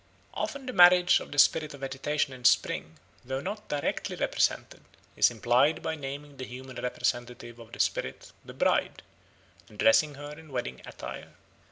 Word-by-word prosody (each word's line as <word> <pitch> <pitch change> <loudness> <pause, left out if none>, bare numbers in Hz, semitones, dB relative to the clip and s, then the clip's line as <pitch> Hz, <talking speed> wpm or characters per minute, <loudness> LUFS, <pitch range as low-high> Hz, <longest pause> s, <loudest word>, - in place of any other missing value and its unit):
Often 280 -1 -4
the 255 - -5
marriage 180 -1 +7
of - - -10
the 145 - -7
spirit 150 +1 +4
of 140 - -15
vegetation 135 +1 -2
in 125 -1 -12
spring, 80 -9 +2 0.3
though 130 +1 -3
not 210 +8 -6
directly 145 -1 -2
represented, - - -1 0.3
is - - +5
implied 120 - +2
by 160 - -2
naming 145 -1 -7
the 130 - -6
human 130 +1 -10
representative 120 -1 -3
of 115 -1 -13
the - - -11
spirit, - - -2
"the - - -12
Bride," - - +1 0.7
and 105 - -16
dressing 145 +8 +4
her 145 +1 -8
in 155 0 -12
wedding 120 - -4
attire. - - -9
135 Hz, 165 wpm, -28 LUFS, 125-150 Hz, 0.7 s, marriage